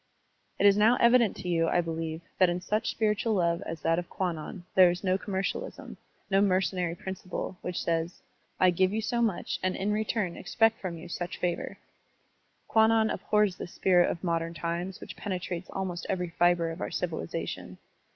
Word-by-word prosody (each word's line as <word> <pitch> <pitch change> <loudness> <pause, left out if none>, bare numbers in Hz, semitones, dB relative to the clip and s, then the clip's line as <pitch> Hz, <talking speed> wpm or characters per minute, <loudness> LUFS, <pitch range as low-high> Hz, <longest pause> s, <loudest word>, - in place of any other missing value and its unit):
It - - +2
is 200 0 +7
now 220 +4 +5
evident 235 -2 +5
to - - -7
you, 165 -2 +2
I 175 - +2
beUeve, 165 -1 -3 0.2
that 185 -2 +6
in 175 +1 -1
such 210 +5 -1
spiritual 215 0 +1
love 170 -1 +1
as 165 -2 -5
that 165 +1 +2
of 175 - -7
Kwannon 175 0 -4
there 185 -2 +7
is 175 +2 -3
no 185 -1 +2
commercialism, 195 0 -4 0.4
no 195 +1 +4
mercenary 185 -3 +1
principle, 185 0 -6
which 180 -1 -3
says, 165 +1 -2 0.4
"I 185 -1 +5
give 185 +2 +2
you 220 +2 -1
so 235 +3 0
much 215 -7 -1
and 185 0 0
in 200 +2 -1
return 210 -4 -1
expect 225 0 +2
from 175 -3 -4
you 165 - -9
such 175 +1 -4
favor." 175 -1 -2 0.9
Kwannon 220 0 +4
abhors 210 -3 +1
this 175 - -7
spirit 180 -2 +4
of 170 - -4
modem 165 -1 -1
times 170 +3 -3
which - - -8
penetrates 180 -3 -4
almost 180 -3 -4
every 180 -2 -1
fibre 175 -1 +2
of 165 +4 -8
our - - -2
civilization. 160 - -4
180 Hz, 180 wpm, -29 LUFS, 170-200 Hz, 0.9 s, is